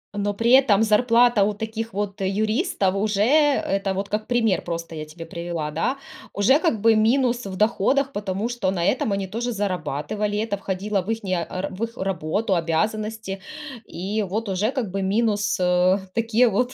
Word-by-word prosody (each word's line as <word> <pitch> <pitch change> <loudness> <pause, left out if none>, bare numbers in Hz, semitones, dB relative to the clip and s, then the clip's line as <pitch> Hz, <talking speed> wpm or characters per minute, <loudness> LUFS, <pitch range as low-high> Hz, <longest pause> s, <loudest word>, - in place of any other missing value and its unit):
Но, 205 0 -1
при 230 +3 +1
этом 240 -6 +6
зарплата 230 0 +4
у 210 - +1
таких, 220 +1 -4
вот, 200 0 -3
юристов, 205 - 0
уже, 205 0 0
это 245 -9 +2
вот 200 +1 -3
как 215 +1 -2
пример, 225 -5 +2
просто, 165 -1 -5
я 155 -1 -5
тебе 165 +2 -10
привела, 170 -2 -4
да, 210 - -1 0.4
уже, 250 +9 +4
как 315 - 0
бы 225 0 +5
минус 240 0 +2
в 190 - -6
доходах, 260 +6 +2
потому 205 +2 -2
что 240 -6 -1
на 175 -2 -1
этом 235 -4 +1
они 195 -1 -1
тоже 235 +5 -3
зарабатывали, 205 +1 -2
это 215 -2 -1
входило 195 +1 -2
в 185 - -9
ихние, 190 -6 -1
а, 185 - -6
р 195 - -2
в 205 +5 -4
их 230 +1 -5
работу, 190 +2 -1
обязанности, 210 +4 -2 0.5
и, 200 +5 -3
вот, 205 +2 -3
уже, 205 +6 0
как 240 -9 -3
бы 195 - -2
минус, 210 +1 +1
а, 180 +2 +3
такие 230 +2 +3
вот 245 +5 0
205 Hz, 180 wpm, -23 LUFS, 190-225 Hz, 0.5 s, этом